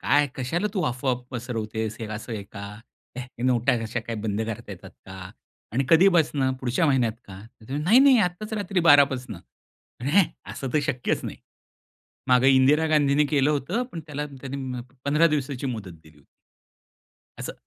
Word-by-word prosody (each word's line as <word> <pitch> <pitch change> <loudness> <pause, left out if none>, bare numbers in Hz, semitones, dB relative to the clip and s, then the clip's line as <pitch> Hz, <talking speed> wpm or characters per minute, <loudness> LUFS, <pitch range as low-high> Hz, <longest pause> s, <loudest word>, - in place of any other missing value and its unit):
"काय? 145 +2 +3
कशाला 160 +10 -1
तू 190 - 0
अफवा 125 +1 0 0.2
पसरवतेस. 110 -3 -4
हे 110 - -4
असं 110 +2 -6
आहे 105 -2 -4
का? 100 -1 -8 0.6
हॅ, 125 - -5 0.2
नोटा 125 -2 +2
हे 120 -2 -1
कशा 115 +2 -3
काय 115 - -4
बंद 105 0 -1
करता 115 -1 -6
येतात 90 - -11 0.2
का? 95 0 -9 0.4
आणि 135 +4 0
कधीपासून? 160 -6 +4
पुढच्या 130 +5 +1
महिन्यात 125 -6 +2
का?" 95 -1 -11
तर 110 0 -18
ती - - -6
म्हणे, 150 +2 -2
"नाही-नाही, 255 - +6
आत्ताच 210 +5 -10
रात्री 200 -3 -1
12 145 0 +8
पासून." 125 -5 -6
तर 105 +7 -15
"हॅ, 195 -1 +6 0.3
असं 135 - -5
तर - - +3
शक्यच 125 0 -1
नाही. - - -6 0.9
मागे 125 +1 +5
इंदिरा 135 +4 +4
गांधींनी 150 -1 +3
केलं 145 -1 +3
होतं. 150 - -1
पण 165 - -5
त्याला 150 -1 -4
त्यांनी 135 -1 -8 0.2
अंम, - - -4 0.2
15 150 +4 +4
दिवसाची 140 -4 -2
मुदत 110 -8 -5
दिली 80 -1 -19
होती." 70 - -26 1.1
असं. - - -5
130 Hz, 175 wpm, -25 LUFS, 115-150 Hz, 1.1 s, 12